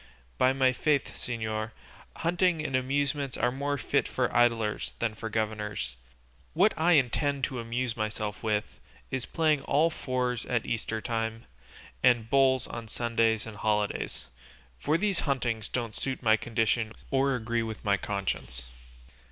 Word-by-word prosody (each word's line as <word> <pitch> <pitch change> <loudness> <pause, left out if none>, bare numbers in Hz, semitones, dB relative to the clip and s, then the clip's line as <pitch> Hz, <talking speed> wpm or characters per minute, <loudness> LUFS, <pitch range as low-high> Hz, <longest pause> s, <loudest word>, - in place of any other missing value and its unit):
By 130 0 +5
my 130 -1 +3
faith, 145 +1 +1
señor, 110 -2 -3 0.4
hunting 175 -2 +1
and 135 - -1
amusements 140 +1 0
are 120 +2 +2
more 140 +2 -1
fit - - +1
for - - -1
idlers 115 -3 +2
than 115 -2 -1
for 110 +1 -5
governors; 105 - -2 0.6
what 195 +6 +5
I 170 +2 +4
intend 140 0 +2
to 130 -1 -1
amuse 120 +1 -2
myself 110 -1 -3
with 105 -2 -1 0.3
is 130 -5 -2
playing 155 -3 +2
all 155 +5 +3
fours 125 -5 -1
at 115 -3 0
Eastertime, 115 0 -2 0.6
and 120 -3 +3
bowls 135 -1 +4
on 115 -1 -7
Sundays 115 -1 +1
and 110 -2 -8
holidays; 105 -1 -1 0.5
for 150 +3 +2
these 200 -1 +1
huntings 120 -5 0
don't 115 -3 -3
suit 130 +2 -1
my 110 -1 +6
condition 115 0 0 0.2
or 135 0 +3
agree 115 -1 -1
with 110 -1 -5
my 100 -1 +4
conscience." 95 -11 -3
120 Hz, 145 wpm, -29 LUFS, 110-135 Hz, 0.6 s, my